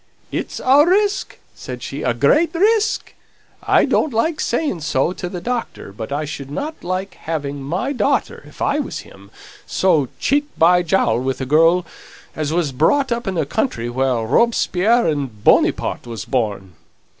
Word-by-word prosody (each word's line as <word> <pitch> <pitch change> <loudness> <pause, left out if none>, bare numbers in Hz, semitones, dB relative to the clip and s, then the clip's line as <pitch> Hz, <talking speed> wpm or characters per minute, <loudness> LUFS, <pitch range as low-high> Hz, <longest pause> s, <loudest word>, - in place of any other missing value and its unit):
"It's - - -4
a 275 +3 +5
risk," 400 +4 +1 0.2
said 125 -2 -8
she, 140 +2 -5
"a 125 -4 0
great 300 - +3
risk. 425 +3 +1 0.5
I - - +3
don't 310 - +1
like 295 +8 0
saying 285 - -1
so 155 +2 0
to 180 -1 -5
the 180 - -5
doctor, 240 - -4
but 110 +4 -7
I 145 +2 -1
shouldn't 150 - -6
like 185 +2 -3
having 145 -3 -4
my 180 - -2
daughter, 255 - 0
if - - -7
I 285 - +1
was 285 - -4
him, 100 0 -16 0.4
so 165 -8 +2
cheek 290 +2 +1
by 180 +2 +5
jowl 175 -7 +1
with 130 +1 -2
a 130 - -3
girl 165 +5 +4 0.5
as 155 -1 -2
was 165 -3 0
brought 250 - +2
up 235 -1 -2
in 190 - -1
the 160 -3 0
country 135 - -2
where 125 -2 0
Robespierre 230 - +2
and 135 -9 -2
Bonyparte - - +2
was 115 -4 -6
born." 105 -7 -2
165 Hz, 165 wpm, -19 LUFS, -, 0.5 s, a